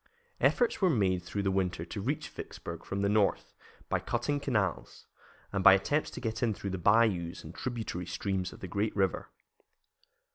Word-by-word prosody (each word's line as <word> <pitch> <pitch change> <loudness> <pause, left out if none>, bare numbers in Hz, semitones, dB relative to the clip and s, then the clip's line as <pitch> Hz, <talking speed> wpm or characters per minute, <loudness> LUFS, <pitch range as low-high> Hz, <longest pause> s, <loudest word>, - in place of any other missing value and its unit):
Efforts 480 - +2
were 185 - +5
made 95 - +2
through 100 +3 -3
the 95 - +1
winter 90 -3 -1
to 100 +4 -5
reach 140 +8 -2
Vicksburg - - -8
from 100 0 -3
the - - +3
north 105 -1 +1 0.3
by - - +1
cutting 145 -1 -1
canals, 105 -10 -2 0.5
and 100 -1 0
by - - +10
attempts 145 +11 +1
to - - -7
get 115 -2 -3
in 110 -4 +1
through 100 - -5
the 95 - -3
bayous 100 -3 +2
and 80 - -9
tributary 110 -8 -4
streams 95 +1 -2
of - - -13
the 95 - -5
great 100 +4 -1
river. 95 -4 0
100 Hz, 180 wpm, -31 LUFS, 95-115 Hz, 0.5 s, by